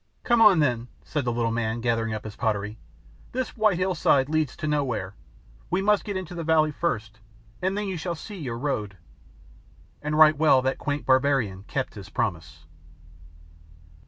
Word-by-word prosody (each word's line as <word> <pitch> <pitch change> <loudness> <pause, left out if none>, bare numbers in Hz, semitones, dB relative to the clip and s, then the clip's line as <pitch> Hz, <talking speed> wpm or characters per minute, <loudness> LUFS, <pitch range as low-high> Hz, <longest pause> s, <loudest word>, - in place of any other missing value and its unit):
"Come 235 -1 +3
on 210 -5 +8
then," 125 -6 +1 0.2
said 145 -4 -3
the 120 - +1
little 115 -1 0
man, 115 0 -1
gathering 115 -1 0
up 110 -1 -4
his 110 -1 -8
property. 105 -1 -2 0.5
"This 255 0 -3
white 215 -5 +3
hillside 170 -7 +2
leads 155 -3 0
to - - -4
nowhere; 130 -11 -1 0.6
we - - +1
must 210 +1 +2
get 200 -3 -3
into 185 -2 -6
the 170 -1 -4
valley 155 -1 +3
first, 110 -9 -3 0.4
and 190 +2 0
then 210 -1 -2
you 190 -2 -3
shall 170 +1 -3
see 205 +5 -9
your 125 -7 -4
road." 110 -8 -3 1.0
And 150 +1 -2
right 155 -1 +7
well 145 -4 +4
that 130 0 -1
quaint 145 0 -3
barbarian 130 -8 +2
kept 135 -1 -3
his 100 -2 -10
promise. 80 -6 -3
140 Hz, 170 wpm, -25 LUFS, 115-165 Hz, 1.0 s, on